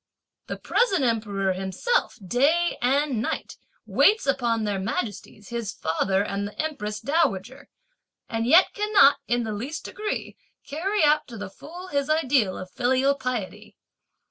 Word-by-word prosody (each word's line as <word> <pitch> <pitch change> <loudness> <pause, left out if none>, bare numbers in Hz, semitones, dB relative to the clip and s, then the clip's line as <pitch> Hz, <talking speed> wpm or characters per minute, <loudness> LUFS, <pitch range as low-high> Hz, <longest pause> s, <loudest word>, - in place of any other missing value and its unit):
The - - -4
present 390 - +1
Emperor 205 -5 0
himself 190 - -1
day 310 - +2
and 265 -1 +1
night - - -4 0.3
waits 430 +2 +3
upon 240 -5 +1
their 205 -2 -1
majesties 205 0 -4
his 235 -4 -3
Father 190 +5 0
and 200 0 -3
the 205 - -13
Empress 215 -10 -3
Dowager, 265 - -1 0.6
and 225 0 -2
yet 340 +8 +6
cannot, 415 -9 +5
in 240 0 +1
the 220 -1 -3
least 260 +10 -5
degree, 425 0 -4 0.3
carry 370 +7 -1
out 300 0 +3
to 235 - -9
the 205 -2 -7
full 355 - -10
his 280 -1 -1
ideal 270 -10 +2
of 185 0 -8
filial 260 +4 +2
piety. 255 -7 -5
245 Hz, 145 wpm, -25 LUFS, 210-305 Hz, 0.6 s, yet